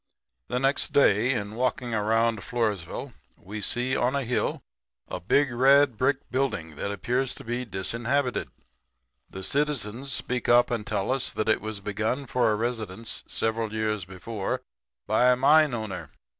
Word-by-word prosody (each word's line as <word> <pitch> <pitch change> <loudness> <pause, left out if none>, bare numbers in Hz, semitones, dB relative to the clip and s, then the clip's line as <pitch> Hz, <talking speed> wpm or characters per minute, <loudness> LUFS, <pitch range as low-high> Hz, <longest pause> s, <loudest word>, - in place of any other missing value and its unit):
"The 125 - -1
next 135 +2 +1
day 120 -3 +4
in 105 -4 -2
walking 125 0 -1
around 110 +1 +2
Floresville 105 -5 -2 0.2
we 105 +3 -7
see 125 +5 0
on 125 +3 +1
a 140 - 0
hill 125 0 -1 0.4
a - - -4
big 140 +8 +2
red 135 +1 +5
brick 135 +4 0
building 130 -11 -1
that 100 - -2
appears 125 +5 -1
to - - -10
be 120 +2 -3
disinhabited. 115 +7 -1 0.8
The 95 - -8
citizens 135 -2 -1
speak 125 0 -2
up 120 +1 +5
and 110 -3 -2
tell 100 +3 -1
us 135 -1 +1
that 110 - -2
it 110 - +3
was 110 -2 -5
begun 110 +7 -2
for 125 -2 +2
a - - +2
residence 115 -2 -3
several 110 -1 -1
years 110 -2 -1
before 95 +2 -4 0.4
by 115 +4 +4
a - - +4
mine 150 +3 +5
owner. 110 -5 -5
115 Hz, 155 wpm, -27 LUFS, 105-130 Hz, 0.8 s, red